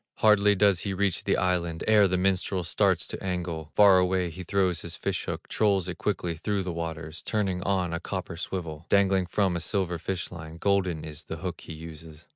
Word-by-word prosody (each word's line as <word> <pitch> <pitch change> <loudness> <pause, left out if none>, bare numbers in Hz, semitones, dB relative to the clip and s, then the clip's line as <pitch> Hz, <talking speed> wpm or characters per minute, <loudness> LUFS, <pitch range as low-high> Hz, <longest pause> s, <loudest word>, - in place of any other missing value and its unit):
Hardly 105 -1 +5
does 100 -2 +4
he 95 0 -3
reach 100 -2 0
the - - +2
island 85 -3 0
Ere 105 -2 +6
the 90 0 0
minstrel 95 0 +1
starts 80 - +1
to - - -7
angle; 85 -4 -3
Far 100 -3 +7
away 90 -1 +1
he 90 +4 -8
throws 95 -1 +1
his 85 0 -4
fish - - -2
hook, - - -5
Trolls 100 -4 +2
it 90 - -5
quickly 90 -4 -1
through 100 +4 -1
the 90 -2 -3
waters, 80 -1 -5
Turning 95 -4 -1
on 95 -3 0
a 85 - -1
copper 95 -2 -5
swivel 85 -2 -5
Dangling 95 -2 +3
from 95 -1 +1
a - - -1
silver 90 0 -1
fish 90 +1 -3
line, 80 -1 -9
Golden 95 -4 +1
is 75 +1 -7
the 80 - -6
hook 90 0 -5
he - - -8
uses. 80 0 -10
90 Hz, 205 wpm, -27 LUFS, 85-95 Hz, -, Far